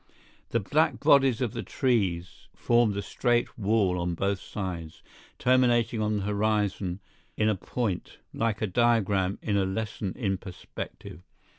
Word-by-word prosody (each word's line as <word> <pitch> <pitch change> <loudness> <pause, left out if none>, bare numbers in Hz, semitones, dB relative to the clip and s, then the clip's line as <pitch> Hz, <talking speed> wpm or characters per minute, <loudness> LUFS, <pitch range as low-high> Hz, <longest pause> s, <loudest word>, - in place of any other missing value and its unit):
The 115 - +1
black 150 +10 +1
bodies 135 -4 +4
of 120 -3 -1
the 120 - -3
trees 95 - -1
formed 120 -4 +2
a 100 - -2
straight 120 +3 0
wall 100 -4 +1
on 85 0 -1
both 100 +2 0
sides, 90 -7 -6 0.3
terminating 120 -3 +3
on 105 0 +1
the 100 - -2
horizon 105 -3 0 0.4
in 110 - +2
a 105 - +2
point, 100 0 -3 0.2
like 110 -2 -1
a - - +3
diagram 100 -3 +2
in 105 -2 +1
a 100 - +3
lesson 100 0 -3
in 95 -7 -1
perspective. 90 -2 -8
105 Hz, 145 wpm, -27 LUFS, 95-120 Hz, 0.4 s, bodies